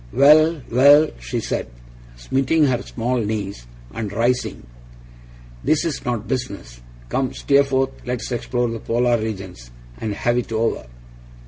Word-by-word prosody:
'Well, 155 Hz, -, +5 dB
well!' 145 Hz, +5 st, +6 dB
she -, -, -3 dB
said, -, -, -3 dB, 0.5 s
smiting 135 Hz, -, +1 dB
her 130 Hz, -3 st, +1 dB
small 125 Hz, +1 st, -2 dB
knees, 105 Hz, -, -3 dB, 0.3 s
and 105 Hz, -3 st, -4 dB
rising, 120 Hz, -, -1 dB, 1.0 s
'this 155 Hz, +2 st, +2 dB
is 160 Hz, -5 st, -3 dB
not 120 Hz, -3 st, -2 dB
business. 100 Hz, -, -5 dB, 0.3 s
Come, 130 Hz, -, -1 dB
Steerforth, 140 Hz, -1 st, +2 dB
let's 125 Hz, 0 st, -4 dB
explore 120 Hz, 0 st, -1 dB
the 115 Hz, -, -4 dB
polar 120 Hz, +1 st, +1 dB
regions, 95 Hz, -, -6 dB, 0.3 s
and 110 Hz, -2 st, -3 dB
have 120 Hz, +3 st, +1 dB
it 120 Hz, -, -6 dB
over. 115 Hz, -, -1 dB
120 Hz, 130 wpm, -21 LUFS, 110-135 Hz, 1.0 s, well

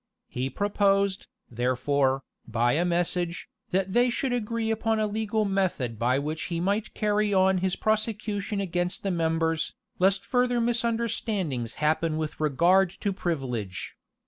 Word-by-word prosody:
He 130 Hz, +2 st, -2 dB
proposed, 200 Hz, +2 st, +1 dB, 0.2 s
therefore, 130 Hz, +3 st, +1 dB, 0.2 s
by 120 Hz, +1 st, +2 dB
a 160 Hz, +7 st, +2 dB
message, 175 Hz, 0 st, -1 dB, 0.2 s
that 190 Hz, +1 st, 0 dB
they 245 Hz, +1 st, +4 dB
would 260 Hz, -2 st, +1 dB
agree 230 Hz, -1 st, -1 dB
upon 225 Hz, 0 st, 0 dB
a 215 Hz, -, +1 dB
legal 215 Hz, 0 st, 0 dB
method 180 Hz, -, -1 dB
by 125 Hz, +3 st, +2 dB
which 155 Hz, +3 st, -3 dB
he 170 Hz, -2 st, -2 dB
might 200 Hz, +4 st, -1 dB
carry 210 Hz, -1 st, +1 dB
on 190 Hz, 0 st, +4 dB
his 185 Hz, 0 st, 0 dB
prosecution 210 Hz, -1 st, -1 dB
against 180 Hz, -2 st, -2 dB
the 195 Hz, -, 0 dB
members, 165 Hz, -1 st, 0 dB, 0.2 s
lest 190 Hz, +1 st, +3 dB
further 245 Hz, -1 st, +2 dB
misunderstandings 225 Hz, -, -1 dB
happen 155 Hz, +1 st, +1 dB
with 155 Hz, -1 st, -4 dB
regard 170 Hz, +6 st, +4 dB
to 200 Hz, -, 0 dB
privilege. 125 Hz, -, -3 dB
185 Hz, 140 wpm, -27 LUFS, 155-210 Hz, 0.2 s, they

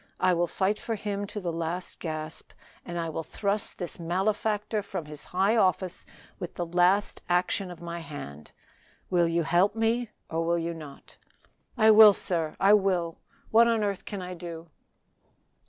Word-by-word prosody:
I 185 Hz, 0 st, +3 dB
will 175 Hz, 0 st, +1 dB
fight 195 Hz, +4 st, 0 dB
for 225 Hz, -, -3 dB
Him 205 Hz, -1 st, -3 dB
to 210 Hz, -, -5 dB
the 175 Hz, -4 st, -3 dB
last 170 Hz, +2 st, -4 dB
gasp, 155 Hz, -1 st, -6 dB, 0.3 s
and 175 Hz, -1 st, -6 dB
I 165 Hz, -1 st, -2 dB
will 160 Hz, -, -3 dB
thrust 200 Hz, +5 st, -1 dB
this 175 Hz, -2 st, -5 dB
malefactor 210 Hz, +5 st, 0 dB
from 185 Hz, -5 st, -5 dB
his 150 Hz, 0 st, -9 dB
high 195 Hz, +5 st, +1 dB
office 185 Hz, -4 st, +1 dB, 0.3 s
with 175 Hz, -, -6 dB
the 175 Hz, -, -2 dB
last 180 Hz, +4 st, +2 dB
action 180 Hz, +2 st, +1 dB
of 175 Hz, -1 st, -10 dB
my 170 Hz, 0 st, -5 dB
hand 75 Hz, -, -9 dB, 0.6 s
Will 175 Hz, -2 st, +3 dB
you 165 Hz, 0 st, +1 dB
help 175 Hz, +6 st, +2 dB
me, 225 Hz, +1 st, +1 dB, 0.2 s
or 165 Hz, 0 st, -1 dB
will 170 Hz, +1 st, +1 dB
you 170 Hz, 0 st, -2 dB
not?" 150 Hz, -4 st, -12 dB, 0.6 s
"I 220 Hz, 0 st, +6 dB
will, 215 Hz, -1 st, +9 dB
sir! 165 Hz, -5 st, -2 dB
I 195 Hz, +2 st, +6 dB
will! 185 Hz, -5 st, +1 dB, 0.3 s
What 230 Hz, +1 st, +6 dB
on 225 Hz, -2 st, +2 dB
earth 200 Hz, -2 st, -2 dB
can 200 Hz, -3 st, -5 dB
I 180 Hz, 0 st, -6 dB
do?" 170 Hz, -2 st, -8 dB
180 Hz, 170 wpm, -28 LUFS, 165-205 Hz, 0.6 s, will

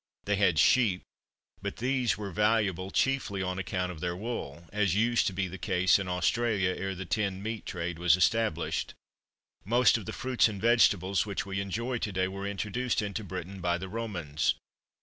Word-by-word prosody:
They 105 Hz, 0 st, +1 dB
had 95 Hz, -5 st, +3 dB
sheep, 100 Hz, -1 st, +4 dB, 0.6 s
but -, -, -4 dB
these 125 Hz, -3 st, 0 dB
were 100 Hz, -2 st, -5 dB
valuable 100 Hz, -2 st, +1 dB
chiefly 100 Hz, -5 st, 0 dB
on 90 Hz, 0 st, -2 dB
account 90 Hz, -1 st, -2 dB
of 85 Hz, -, -9 dB
their 85 Hz, +1 st, -2 dB
wool; 90 Hz, -, -5 dB
as 100 Hz, -4 st, +2 dB
used 115 Hz, +2 st, +2 dB
to 95 Hz, -, -1 dB
be 95 Hz, 0 st, -1 dB
the 95 Hz, +1 st, -8 dB
case 95 Hz, +2 st, +3 dB
in 95 Hz, -, -4 dB
Australia, 95 Hz, +2 st, +1 dB
ere 95 Hz, 0 st, -3 dB
the 95 Hz, +1 st, -6 dB
tinned 100 Hz, -1 st, -1 dB
meat 110 Hz, 0 st, -4 dB
trade 85 Hz, -2 st, -4 dB
was 85 Hz, -2 st, +5 dB
established. 90 Hz, 0 st, 0 dB, 0.7 s
Most 120 Hz, +2 st, +4 dB
of 100 Hz, -, -10 dB
the -, -, -3 dB
fruits 130 Hz, -3 st, +2 dB
and 105 Hz, -3 st, -5 dB
vegetables 100 Hz, -4 st, +3 dB
which 100 Hz, -1 st, -3 dB
we 100 Hz, 0 st, -2 dB
enjoy 120 Hz, +6 st, -2 dB
to 105 Hz, -, -2 dB
day 95 Hz, 0 st, 0 dB
were 100 Hz, +1 st, -5 dB
introduced 105 Hz, +4 st, -1 dB
into 105 Hz, +1 st, -4 dB
Britain 95 Hz, 0 st, -6 dB
by 85 Hz, 0 st, +1 dB
the 95 Hz, +2 st, -7 dB
Romans. 90 Hz, -9 st, -1 dB
100 Hz, 185 wpm, -29 LUFS, 90-110 Hz, 0.7 s, was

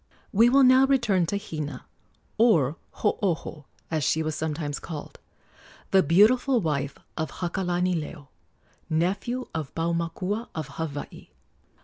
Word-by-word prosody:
We 230 Hz, +4 st, +6 dB
will 275 Hz, +2 st, +5 dB
now 260 Hz, +1 st, +6 dB
return 225 Hz, -10 st, +2 dB
to 200 Hz, -, -1 dB
Hina 155 Hz, -9 st, -6 dB, 0.5 s
or 165 Hz, -, +4 dB, 0.3 s
Hooho, 170 Hz, -7 st, -1 dB, 0.3 s
as 155 Hz, -2 st, 0 dB
she 160 Hz, +4 st, +1 dB
was 155 Hz, 0 st, -2 dB
sometimes 150 Hz, -1 st, -3 dB
called 155 Hz, -4 st, -8 dB, 0.7 s
the 190 Hz, -, +6 dB
beautiful 235 Hz, -, +4 dB
wife 145 Hz, -6 st, -2 dB, 0.2 s
of 160 Hz, -1 st, -2 dB
Hakalanileo, 175 Hz, -4 st, -2 dB, 0.6 s
nephew 195 Hz, +10 st, -1 dB
of 160 Hz, -4 st, -5 dB
Paumakua, 170 Hz, +6 st, -2 dB
of 155 Hz, -3 st, -4 dB
Hawaii. 145 Hz, 0 st, -6 dB
170 Hz, 115 wpm, -26 LUFS, 155-210 Hz, 0.7 s, We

